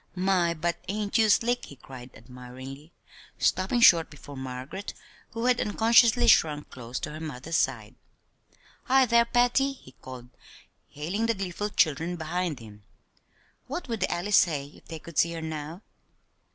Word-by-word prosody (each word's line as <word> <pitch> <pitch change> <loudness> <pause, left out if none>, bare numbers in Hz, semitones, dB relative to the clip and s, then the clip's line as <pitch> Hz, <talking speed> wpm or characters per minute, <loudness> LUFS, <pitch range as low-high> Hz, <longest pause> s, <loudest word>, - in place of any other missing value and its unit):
"My, 180 -2 +1
but 170 +2 -2
ain't 205 +1 -1
you 220 -1 +4
slick!" 240 +3 +2
he 140 - -12
cried 130 -1 -12
admiringly, 130 +5 -11 0.5
stopping 190 +6 +1
short 170 -7 +6
before 145 -1 -12
Margaret, 130 +8 -7 0.4
who 230 +1 -3
had 250 -1 +3
unconsciously 230 +2 +4
shrunk 150 -7 +3
close 125 0 -6
to 150 - -4
her 155 - -8
mother's 155 +1 -4
side. - - -1 0.9
"Hi, 265 0 +4
thar, 235 0 +4
Patty," 245 +3 +2
he 190 - -16
called, 125 -1 -11 0.6
hailing 180 +10 -3
the 230 - +1
gleeful 195 +2 -4
children 165 -1 +1
behind 170 -1 -3
him, 105 -2 -13 0.9
"what 350 - -5
would 230 -3 -3
the 190 - 0
Alley 175 +4 -3
say 155 -7 +3
if - - -19
they 165 - -7
could 165 0 -5
see 170 0 +2
her 165 - -5
now?" 160 +4 -6
170 Hz, 155 wpm, -27 LUFS, 140-215 Hz, 0.9 s, short